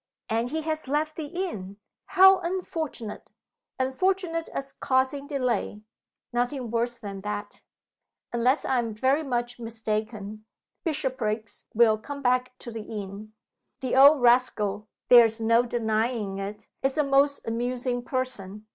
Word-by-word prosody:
"And 230 +2 0
he 315 +3 -3
has 315 -2 -2
left 305 +3 0
the 310 -3 -5
inn! 285 - -5 0.3
How 385 0 +7
unfortunate!" 330 - -4 0.5
"Unfortunate 330 +5 0
as 275 0 -4
causing 265 +2 0
delay 250 -7 -1 0.5
nothing 245 0 -1
worse 240 +1 -1
than 200 -4 -7
that. 205 0 -5 0.7
Unless 250 +4 +2
I 260 - +2
am 230 -3 -3
very 265 +7 +2
much 245 -4 -2
mistaken, 215 -2 -4 0.4
Bishopriggs 245 - -2
will 220 -1 +5
come 280 +5 -7
back 255 0 +1
to 235 - -8
the 225 -1 -5
inn. 210 0 -7 0.5
The 255 -1 -1
old 275 0 +7
rascal 215 -4 +3 0.2
(there 240 -1 +9
is 225 0 -1
no 230 +1 +4
denying 220 -3 -1
it) 200 +2 -6
is 270 +2 0
a 300 - +4
most 280 0 +2
amusing 245 +2 -1
person. 225 -5 -3
245 Hz, 135 wpm, -26 LUFS, 215-275 Hz, 0.7 s, there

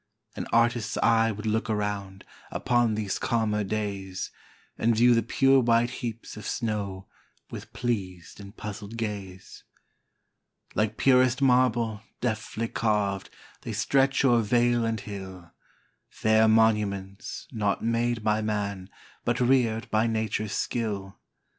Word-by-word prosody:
An - - -5
artist's 115 -1 +2
eye 115 -1 +4
would 105 +1 -7
look 110 +1 0
around, 100 -2 -3 0.2
Upon 120 -3 +1
these 105 -3 -2
calmer 110 -3 0
days, 100 -2 -4 0.4
And 115 0 +2
view 120 +2 +5
the 115 - +3
pure 135 +4 +4
white 120 0 +3
heaps 115 -3 -6
of 105 - -7
snow, 100 -5 -3 0.5
With - - -8
pleas'd 95 -8 -4
and 100 +2 -11
puzzl'd 105 +1 -7
gaze. 100 -4 -6 1.1
Like 110 0 0
purest 130 -1 +4
marble, 125 -5 +2 0.2
deftly 110 -1 -2
carv'd, 105 -3 0 0.3
They - - -5
stretch 135 0 +2
o'er 120 -3 +5
vale 120 +1 +2
and 115 -1 -1
hill, 95 -4 -8 0.6
Fair 110 0 +3
monuments, 105 -3 +1
not 105 -4 -1
made 115 0 0
by 105 0 +2
man, 100 -3 -3 0.3
But 120 +1 0
rear'd 120 -3 +2
by 110 +1 +2
nature's 110 -2 -1
skill. 100 -5 -3
110 Hz, 125 wpm, -27 LUFS, 100-120 Hz, 1.1 s, view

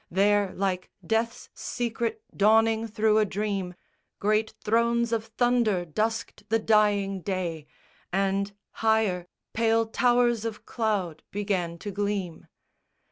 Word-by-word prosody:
There, 200 +1 +3
like 185 -1 -1 0.2
death's 225 +4 -1
secret 235 - -3
dawning 225 +2 +4
thro' 220 0 +2
a - - +5
dream, 195 -3 -2 0.4
Great 215 +2 +1
thrones 235 +1 +2
of 225 -1 0
thunder 235 -7 +2
dusked 215 +4 -3
the 225 - +3
dying 205 -3 +2
day, 170 -4 -3 0.4
And, 195 +1 0 0.2
higher, 220 -6 +1 0.3
pale 225 0 +2
towers 240 0 +2
of 225 -2 -5
cloud 200 -9 -1
began 190 -5 -2
to 205 +4 -6
gleam. 200 -3 -3
210 Hz, 115 wpm, -27 LUFS, 195-225 Hz, 0.4 s, a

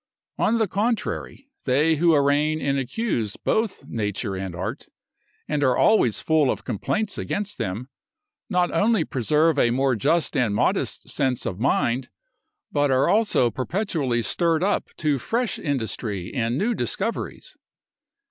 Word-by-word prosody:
On 230 - +2
the 220 -2 +1
contrary, 225 +6 -2 0.2
they 150 +5 +3
who 165 +1 +4
arraign 145 +2 +2
and 140 -2 0
accuse 130 - -2
both 220 -2 -1
nature 105 -2 -3
and 95 -2 -5
art, 105 +10 -5 0.6
and 150 -1 -1
are 130 -3 +3
always 215 - +3
full 155 -4 +2
of - - -2
complaints 200 - -2
against 205 0 -3
them, 100 +7 -3 0.6
not 180 -3 +1
only 210 -5 +2
preserve 150 +5 +2
a 120 - +4
more 130 +1 +1
just 160 - +1
and 120 -7 +1
modest - - 0
sense 130 -3 0
of 90 - -3
mind, 125 0 +1 0.6
but 145 0 +2
are 130 0 +3
also 205 - +3
perpetually 135 - -1
stirred 165 +3 +1
up 205 - 0
to 150 -3 0
fresh 235 - -1
industry 110 - -3
and 120 0 -1
new 230 +5 +1
discoveries. - - -3
140 Hz, 140 wpm, -24 LUFS, 120-180 Hz, 0.6 s, who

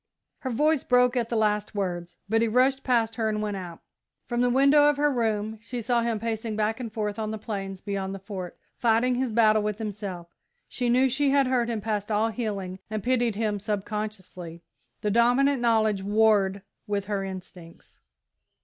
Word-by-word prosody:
Her 260 - -4
voice 300 +4 +2
broke 250 0 +3
at 235 -2 0
the 235 - -1
last 210 -1 0
words, 175 -3 -3
but 225 +2 +2
he 230 - +3
rushed 260 +4 +2
past 230 -3 +1
her 220 -2 +1
and 215 0 -1
went 210 -1 -2
out. 175 -3 -8 0.4
From 240 -1 -1
the 245 - +3
window 280 +3 +5
of 295 - 0
her 295 0 +2
room 220 -2 -1
she 240 +2 -5
saw 235 +1 +1
him 230 -2 -1
pacing 225 0 -3
back 215 +2 0
and 235 -3 -5
forth 210 -1 -3
on 215 -1 -2
the 220 - -3
plains 195 -3 -5
beyond 195 -1 -3
the - - -5
Fort, 190 -3 -7 0.2
fighting 235 +2 +2
his 250 -1 -1
battle 215 -1 +4
with 210 -1 -2
himself. 200 -5 -6 0.3
She 245 -1 -2
knew 255 +2 +4
she 275 +2 +1
had 275 0 +4
hurt 250 -2 +1
him 225 -3 -2
past 210 -1 -2
all 215 +1 +2
healing 200 -5 -4
and 215 -2 -3
pitied 245 -3 +1
him 210 -1 -1
subconsciously; 195 -4 -5 0.4
the 210 - 0
dominant 245 +4 +3
knowledge 220 -4 +2
warred 200 -1 +2 0.2
with 200 -1 -1
her 200 -1 -2
instincts. 185 -3 -10
220 Hz, 190 wpm, -26 LUFS, 200-240 Hz, 0.4 s, window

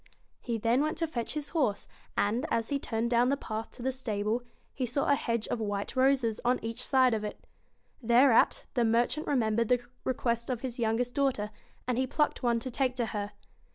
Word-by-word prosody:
He 235 -2 -2
then 230 +4 +2
went 310 +1 -1
to 330 - +1
fetch 250 -4 -3
his 295 -2 -3
horse, 265 -12 0 0.3
and, 230 +9 +1
as 230 -1 0
he 280 - 0
turned 230 -1 -2
down 240 +1 +4
the 280 - +1
path 220 -3 -5
to 245 - -9
the 265 - +1
stable, 220 -3 -1 0.3
he 265 - -3
saw 250 +3 0
a - - +4
hedge 230 -5 -1
of 240 - -1
white 205 0 -3
roses 260 -4 +2
on 250 +1 +3
each 230 +2 -3
side 260 -3 +4
of 215 -1 -1
it 210 - -6 0.6
Thereat 240 +1 +4
the 240 - +2
merchant 240 +6 +1
remembered 230 -4 +2
the 245 0 +2 0.2
request 235 -2 -1
of 245 -3 -2
his 250 -2 -5
youngest 235 +2 0
daughter, 255 -7 0 0.4
and 250 -1 0
he 260 - +1
plucked 300 +3 0
one 235 -2 +2
to 255 - -4
take 255 0 0
to 240 -2 0
her. 205 -1 -3
240 Hz, 205 wpm, -30 LUFS, 225-260 Hz, 0.6 s, down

